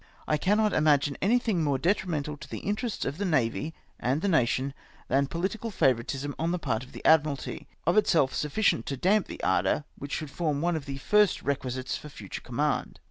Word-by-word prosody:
I 155 Hz, -, +3 dB
cannot 210 Hz, +7 st, +2 dB
imagine 145 Hz, -2 st, +3 dB
an3;1:hing 220 Hz, -3 st, +2 dB
more 140 Hz, -3 st, +1 dB
detri 185 Hz, +6 st, +1 dB
mental 150 Hz, -3 st, -2 dB
to 150 Hz, -, -12 dB
the -, -, -5 dB
interests 210 Hz, +2 st, -2 dB
of 140 Hz, +6 st, -3 dB
the -, -, 0 dB
Navy 150 Hz, -, 0 dB, 0.2 s
and 130 Hz, +5 st, +1 dB
the -, -, +2 dB
nation, 135 Hz, -5 st, +2 dB, 0.4 s
than 135 Hz, +2 st, +2 dB
pohtical 195 Hz, +8 st, -3 dB
favouritism 135 Hz, -, 0 dB
on 165 Hz, -, 0 dB
the 180 Hz, -, 0 dB
part 115 Hz, -8 st, -2 dB
of 130 Hz, -, -13 dB
the -, -, -10 dB
Admi 160 Hz, -1 st, +6 dB
ralty 140 Hz, -3 st, -5 dB
— -, -, -39 dB
of 175 Hz, +5 st, +3 dB
itself 160 Hz, -10 st, +3 dB
sufficient 150 Hz, -, +1 dB
to 140 Hz, -, -2 dB
damp 195 Hz, +7 st, +2 dB
that -, -, -8 dB
ardour 150 Hz, -, +2 dB, 0.2 s
which 140 Hz, 0 st, -6 dB
should 155 Hz, -3 st, -3 dB
form 155 Hz, -4 st, -1 dB
one 175 Hz, +2 st, +1 dB
of 155 Hz, -2 st, -5 dB
the 135 Hz, -1 st, -4 dB
first 210 Hz, +8 st, +3 dB
requisites 130 Hz, -2 st, -2 dB
for 150 Hz, -, -10 dB
future 105 Hz, -8 st, -8 dB
command. -, -, -1 dB
150 Hz, 205 wpm, -28 LUFS, 135-185 Hz, 0.4 s, Admi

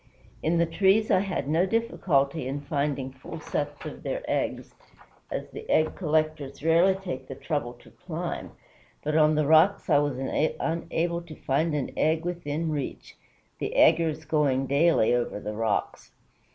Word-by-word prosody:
"In 165 Hz, +2 st, +1 dB
the 170 Hz, -, +4 dB
trees 195 Hz, +6 st, +3 dB
I -, -, +5 dB
had 190 Hz, -7 st, -2 dB
no 165 Hz, +5 st, +2 dB
difficulty 160 Hz, -, 0 dB
in 140 Hz, +2 st, -3 dB
finding 140 Hz, -2 st, -2 dB
full 135 Hz, +5 st, -9 dB
sets 145 Hz, -1 st, -4 dB
of -, -, -7 dB
their -, -, -3 dB
eggs, -, -, -2 dB, 0.6 s
as -, -, -4 dB
the 440 Hz, +1 st, -9 dB
egg 155 Hz, 0 st, +2 dB
collectors 155 Hz, -4 st, -1 dB
rarely 170 Hz, +4 st, +4 dB
take 175 Hz, -9 st, -6 dB
the 135 Hz, -, -7 dB
trouble 145 Hz, -6 st, -3 dB
to 120 Hz, -, -18 dB
climb, 175 Hz, -1 st, -5 dB, 0.5 s
but 150 Hz, +1 st, -1 dB
on 155 Hz, -1 st, +5 dB
the 155 Hz, 0 st, +2 dB
rocks 160 Hz, +5 st, +4 dB
I 145 Hz, -, +6 dB
was 145 Hz, -3 st, -1 dB
unable 165 Hz, +4 st, -1 dB
to 170 Hz, -2 st, -11 dB
find 150 Hz, +4 st, 0 dB
an 140 Hz, -3 st, -2 dB
egg 160 Hz, +2 st, +1 dB
within 165 Hz, -2 st, -2 dB
reach, 145 Hz, -3 st, -5 dB, 0.4 s
the -, -, -3 dB
'eggers' 160 Hz, -2 st, +4 dB
going 145 Hz, -4 st, +1 dB
daily 140 Hz, -3 st, +3 dB
over 120 Hz, -4 st, -1 dB
the 105 Hz, +1 st, -5 dB
rocks. 110 Hz, -1 st, -2 dB
155 Hz, 160 wpm, -27 LUFS, 140-170 Hz, 0.6 s, I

